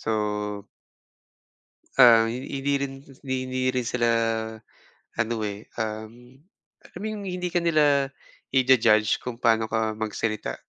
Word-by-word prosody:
so 110 - -2 1.8
ah, 115 -3 +7
hi 120 - -3 0.2
hindi 140 +1 0
rin 140 -1 -3 0.3
hindi 130 -1 -1
rin 125 -2 -2
sila 120 -1 +1 1.1
ano, 115 +1 0
eh, 105 0 -4 0.2
um, 110 +4 -6 0.5
alam 175 - -12
mo - - -3
yung 210 -2 -6
hindi 180 -1 -3
ka 175 - +1
nila 145 -5 +2 0.4
i-ja-judge 120 -5 +4
kung 125 -1 -6
pa'no 115 -1 +3
ka 110 -1 -1
magsalita. 110 - -3
125 Hz, 125 wpm, -25 LUFS, 110-135 Hz, 1.8 s, ah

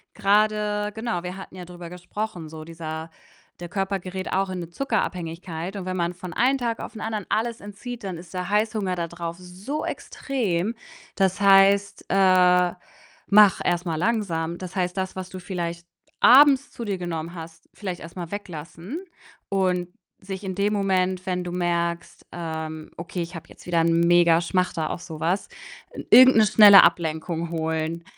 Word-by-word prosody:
Grade 210 0 +1
genau, 220 -6 -3
wir 180 +1 -5
hatten 190 - -10
ja 180 -1 -8
drüber 175 -1 -10
gesprochen, 180 0 -6
so 155 0 -9
dieser 160 0 -7 0.5
der 175 - -6
Körper 195 +1 -1
gerät 185 +1 -5
auch 195 0 +1
in 185 - -4
'ne 170 - -6
Zuckerabhängigkeit, 180 -5 -3
und 185 - -6
wenn 185 0 -3
man 170 0 -1
von 180 0 -8
einem 265 +7 +2
Tag 235 -2 -2
auf - - -6
den 220 - -9
anderen 215 -3 -3
alles 230 +1 -1
entzieht, 210 +3 -8
dann 185 -3 -5
ist 170 +1 -12
der 180 -1 -3
Heißhunger 210 -3 0
da 170 -1 -3
drauf 170 0 -6
so 190 +12 -6
extrem. 220 -6 -2 0.4
Das 190 -1 +1
heißt, 200 0 +4
äh, 180 -2 +4 0.5
mach 205 -1 +6
erst 175 0 0
mal 160 - -1
langsam. 170 -4 -1
Das 185 +1 -8
heißt, 180 -1 -1
das, 190 0 -3
was 185 -1 -6
du 185 - -8
vielleicht 175 -2 -5 0.3
abends 280 +1 +7
zu 235 - -7
dir 200 -2 -2
genommen 170 -1 -4
hast, 165 -1 -10
vielleicht 185 -4 -5
erst 165 +2 -10
mal 170 -2 -5
weglassen 185 - -7 0.5
und 185 -2 0 0.3
sich 190 +1 -7
in 190 -1 -4
dem 205 +2 +1
Moment, 185 -2 0
wenn 180 -1 -2
du 175 - -4
merkst, 170 -1 -2
ähm: 160 -2 -5
„Okay, 170 +1 -5
ich 170 +1 -6
habe 165 - -9
jetzt - - -16
wieder 170 -1 +1
'n 165 0 +2
mega 170 -1 +5
Schmachter 175 -3 -1
auf 175 - -5
so 160 -3 -9
was“, 175 +5 0 0.4
äh, - - -8
irgend 255 -2 +8
'ne 215 - +6
schnelle 210 -2 +9
Ablenkung 165 0 0
holen. 160 0 -2
180 Hz, 175 wpm, -24 LUFS, 170-200 Hz, 0.5 s, schnelle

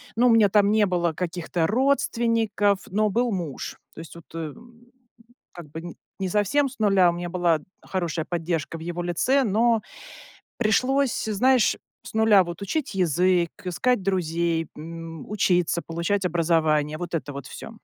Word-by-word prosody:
ну, 240 +2 +4
у - - +5
меня 220 -3 +5
там 205 0 +4
не 215 -1 +3
было 175 -2 0
каких-то 170 -1 -2
родственников, 230 -4 +1
но 215 +2 +1
был 240 +3 +1
муж. 170 -9 -4 0.2
То - - -11
есть, 165 0 -10
вот, 170 -1 -12
эм, 230 +10 -9 0.7
как 170 -4 -11
бы, 165 +3 -8 0.2
не 190 -1 -2
совсем 210 +9 +2
с 245 - -15
нуля, 195 -4 +4
у - - 0
меня 175 0 -5
была 170 -2 +1 0.2
хорошая 170 -4 -3
поддержка 165 -2 -3
в - - -11
его 175 +1 -4
лице, 255 +11 +2
но 225 +1 +2 0.8
пришлось, 255 +4 +1
знаешь, 240 +3 +3 0.3
с - - -11
нуля 220 -3 +5
вот 175 +2 -7
учить 275 +5 -2
язык, 180 -1 +2
искать 205 +5 0
друзей, 170 -3 0
м, 165 0 -8
учиться, 180 -4 +1
получать 170 +4 -1
образование, 160 -3 +1
вот 175 0 -5
это 150 -3 -3
вот 140 -2 -8
всё. - - -9
180 Hz, 160 wpm, -24 LUFS, 165-220 Hz, 0.8 s, у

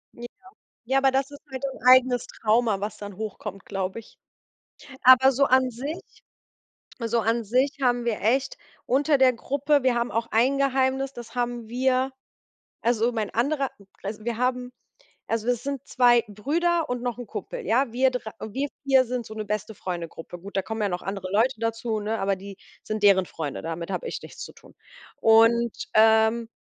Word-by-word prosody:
Ja. 240 - -8 0.6
Ja, 265 +3 +2
aber 270 0 +4
das 270 +1 0
ist 285 - -11
halt 260 0 -6
ein 265 -3 -5
eigenes 255 -1 +5
Trauma, 220 -2 +1
was 205 +1 -4
dann 205 -2 -9
hochkommt, 210 -2 -6
glaube 195 +3 -4
ich. - - -20 0.8
Aber 260 +1 +7
so 275 +2 +3
an 260 -1 +3
sich 280 +8 -5 1.1
so 230 +1 +1
an 230 +2 0
sich 255 +7 +1
haben 245 -1 +2
wir 230 -3 -1
echt 260 +5 +1 0.3
unter 285 +3 +3
der 260 -1 +6
Gruppe 280 +3 0
wir 255 -2 +3
haben 235 0 0
auch 230 +2 -1
ein 255 +5 +3
Geheimnis, 270 0 +1
das 240 0 -10
haben 240 -2 -2
wir 255 +2 +1 0.7
also 235 0 +1
mein 220 -3 -3
anderer 275 +3 0 0.3
also, 210 +2 -6
wir 235 -1 -2
haben 250 0 -1 0.6
also, 225 +1 -1
das 245 0 0
sind 280 -2 -4
2 240 -2 +4
Brüder 325 - 0
und 245 -1 -3
noch 245 -1 -3
'n 245 - -7
Kumpel, - - -6
ja? 245 0 +2
Wir 260 +2 +3
dre 235 -3 -4
wir 265 +7 -3 0.2
4 265 -2 +5
sind 245 -1 -4
so 220 - -9
'ne 215 -1 -4
Beste-Freunde-Gruppe. 185 -5 -5
Gut, 200 +3 -9
da 195 - +1
kommen 220 +3 -5
ja 205 - +1
noch 180 -1 -4
andere 195 0 -5
Leute 235 +5 +2
dazu, 225 -1 -2
ne, 215 +1 -2
aber 195 0 0
die 195 0 -10 0.3
sind 215 -1 -4
deren 190 -3 +5
Freunde, 150 -4 -5
damit 165 +2 -5
habe - - -3
ich - - -5
nichts - - -10
zu - - -11
tun. - - -19 0.4
Und, 230 +1 +4 0.2
ähm, 220 +1 +4
235 Hz, 185 wpm, -25 LUFS, 215-260 Hz, 1.1 s, Aber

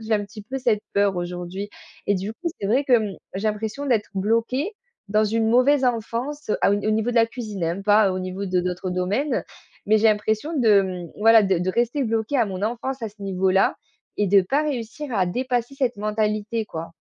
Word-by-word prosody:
j'ai 220 0 -3
un 210 - +2
petit 210 +1 -11
peu 260 +6 -5
cette 230 -5 +1
peur 200 -2 +2
aujourd'hui 180 +3 -5 0.4
et 205 - +3
du 195 +3 -3
coup, 340 +7 -3
c'est 200 - -2
vrai 260 +6 +2
que, 265 - 0
mmh, 210 -3 -4 0.2
j'ai 210 +3 0
l'impression 220 +6 -3
d'être 225 -6 +1
bloquée 230 - 0 0.4
dans 215 +1 +3
une 220 +1 +1
mauvaise 260 +3 +4
enfance 245 +4 -2
à - - +4
au 200 - +4
n 205 - -2
au - - +2
niveau 220 +2 +1
de - - -5
la 230 0 +5
cuisine, 220 -6 -5
hein, 170 +4 -2
pas 205 -1 +4
au 185 - -2
niveau 185 +2 -4
de 185 -1 +1
d'autres 180 +1 -3
domaines. 195 +11 0 0.4
Mais 215 +2 +5
j'ai 225 - +3
l'impression 215 +7 0
de, 215 -5 +5
mmh 180 -3 -6
voilà, 225 +1 +6
de 190 -3 +2
de 180 +2 0
rester 240 +6 0
bloquée 225 +3 -1
à 240 - +4
mon 190 -1 -5
enfance 245 +4 -3
à 225 - -2
ce 210 0 -22
niveau-là 190 0 +2 0.4
et 205 - +2
de 195 0 +5
pas 275 +11 +1
réussir 270 0 -4
à 185 - +3
dépasser 245 +5 -2
cette 255 -4 0
mentalité, 215 +1 -1
quoi. 165 -2 -6
215 Hz, 220 wpm, -23 LUFS, 195-240 Hz, 0.4 s, voilà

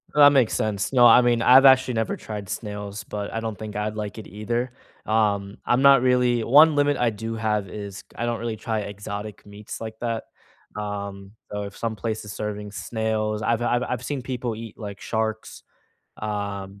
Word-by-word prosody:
That 145 -1 +9
makes 130 -5 +3
sense. 105 -2 -1
No. 125 -3 +6
I 120 +2 +8
mean, 120 -1 +2
I've 130 +3 +7
actually 130 -1 +6
never 115 -1 -1
tried 105 -3 -7
snails, 105 -1 -5
but 105 -1 -5
I 115 - -2
don't 110 -2 -4
think 110 -1 -7
I'd 105 +1 -2
like 105 -1 -5
it 110 - -8
either, 120 +5 -3 0.3
um, 105 -2 0
I'm 120 +2 +2
not 140 -2 +7
really 125 -2 +3
1 150 +6 +6
limit 145 0 +3
I 125 -2 +2
do 115 +1 -5
have 105 -3 -1
is 100 0 -7
I 120 - -2
don't 120 -1 -1
really 115 -1 -3
try 110 0 -2
exotic 100 +1 -7
meats 100 +1 -9
like 110 -1 -6
that, 115 -2 -2 0.5
um, 100 -1 -5 0.2
so 105 0 -3
if 100 -1 -8
some 115 -1 -3
place 110 +2 -3
is 105 -1 -8
serving 105 -1 -5
snails 110 0 -2
I've 115 +1 +1
I've 120 0 +1
I've 125 -1 -3
seen 145 -3 -3
people 125 -2 -3
eat 110 -1 -9
like 100 -3 -8
sharks, 110 0 -3 0.6
um, 100 -2 -4
110 Hz, 195 wpm, -24 LUFS, 105-120 Hz, 0.6 s, That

